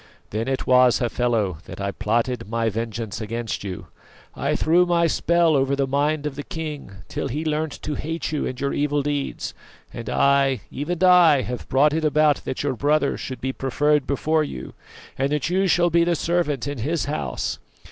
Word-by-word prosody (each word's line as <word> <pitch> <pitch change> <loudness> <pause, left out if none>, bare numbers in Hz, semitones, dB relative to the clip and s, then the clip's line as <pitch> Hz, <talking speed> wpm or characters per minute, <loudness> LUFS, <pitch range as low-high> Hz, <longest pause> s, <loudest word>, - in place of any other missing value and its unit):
Then 110 +3 -2
it 135 -1 -1
was, 125 -1 +5
Hafela, 115 -7 0
that - - -9
I 100 0 -2
plotted 115 +4 -1
vengeance 115 -1 -2
against 115 0 -4
you. 95 -3 -6 0.5
I - - -1
threw 170 +3 +4
my 170 -1 +3
spell 170 -1 +2
over 135 0 +2
the 140 0 +1
mind 145 +3 0
of 150 - -2
the 145 - -4
king, 150 - -6 0.2
till - - -3
he 150 +6 -3
learnt 155 -1 -1
to 150 - -2
hate 160 +3 -3
you 150 - -1
and 130 - -5
your 140 0 -1
evil 145 0 0
deeds; 145 -1 -3 0.4
and 115 -2 -6
I, 140 -3 +3
even 170 +5 -3
I, 175 -6 +6
have 125 0 -6
brought 145 +3 +4
it 160 0 -1
about 150 -1 +3
that 130 - -3
your 145 -2 0
brother 145 +3 +1
should 130 -2 -6
be 130 +1 -2
preferred 145 +2 +1
before 155 +3 +1
you, 65 - -7 0.5
and 135 +1 +1
that 150 +3 -1
you 190 +1 +2
shall 175 -1 +3
be 170 +1 +4
the 170 0 +1
servant 155 -6 0
in 145 -3 -4
his 155 +7 -1
house. 145 +2 -3
140 Hz, 190 wpm, -23 LUFS, 125-155 Hz, 0.5 s, I